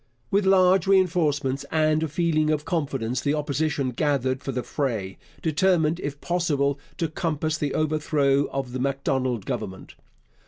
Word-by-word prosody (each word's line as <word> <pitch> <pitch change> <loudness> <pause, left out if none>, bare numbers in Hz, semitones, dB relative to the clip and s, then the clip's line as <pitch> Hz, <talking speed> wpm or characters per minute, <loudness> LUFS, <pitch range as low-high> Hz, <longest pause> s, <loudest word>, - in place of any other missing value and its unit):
With 200 0 +2
large 190 0 +4
reinforcements 155 -8 +2
and 155 0 +2
a 160 - 0
feeling 155 0 +1
of 150 -1 0
confidence, 135 -7 -1
the 145 +1 +1
Opposition 145 -2 -1
gathered 130 -1 0
for 135 - -4
the 125 -1 -3
fray, 110 -10 -3 0.2
determined, 165 0 +2
if 145 -3 -5
possible, 145 -6 0 0.2
to 165 - 0
compass 155 -1 -2
the 145 -2 -1
overthrow 150 -2 +1
of 135 -2 -4
the 130 - -4
Macdonald 130 -4 -1
Government. 95 0 -5
150 Hz, 145 wpm, -25 LUFS, 135-160 Hz, 0.2 s, large